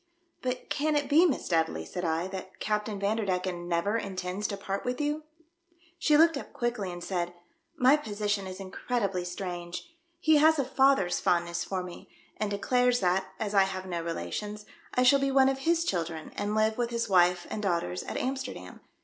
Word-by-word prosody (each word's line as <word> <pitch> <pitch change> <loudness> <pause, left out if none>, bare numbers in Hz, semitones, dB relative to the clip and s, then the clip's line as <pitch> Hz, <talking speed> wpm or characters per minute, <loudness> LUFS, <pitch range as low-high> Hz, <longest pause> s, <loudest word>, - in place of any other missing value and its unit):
" 345 - -44
But 255 0 -3
can 300 +1 +1
it 290 -1 +1
be, 315 +6 +6
Miss 280 - -2
Dudley," 160 - 0
said 180 - -5
I, 165 +1 0
" - - -10
that 190 0 -7
Captain 210 -1 -1
Vanderdecken 185 -4 -1
never 175 +6 +1
intends 190 0 -3
to 200 - -4
part 195 0 -3
with 250 0 -2
you 300 +1 -1 0.3
?" 345 0 -34
She 305 -4 +4
looked 325 -1 +5
up - - -8
quickly, 240 -6 -2
and 175 0 -7
said, 175 -2 -2 0.4
"My 270 +1 +6
position 205 -6 -2
is 185 0 -7
incredibly 195 -1 -2
strange. 175 - -6 0.3
He 315 -2 +5
has 315 +2 +5
a 275 - +1
father's 265 -10 +3
fondness 170 0 +1
for 185 -2 -3
me, 180 -1 -10 0.3
and 215 0 -1
declares 245 +5 +2
that, 185 +1 +2
as 210 -1 -2
I 195 -1 +6
have 190 -1 -5
no 175 -2 -3
relations, 210 +5 -4 0.3
I 250 - +4
shall 275 +2 +6
be 275 0 +1
one 270 0 +5
of 270 0 -1
his 335 +4 +2
children, 165 -3 -2
and 205 +1 -2
live 220 +1 +2
with 240 -1 +1
his 235 -1 -1
wife 180 -2 +4
and 215 - -3
daughters 170 - -1
at - - -5
AmiSterdam. 265 +1 -4
205 Hz, 195 wpm, -29 LUFS, 180-265 Hz, 0.4 s, be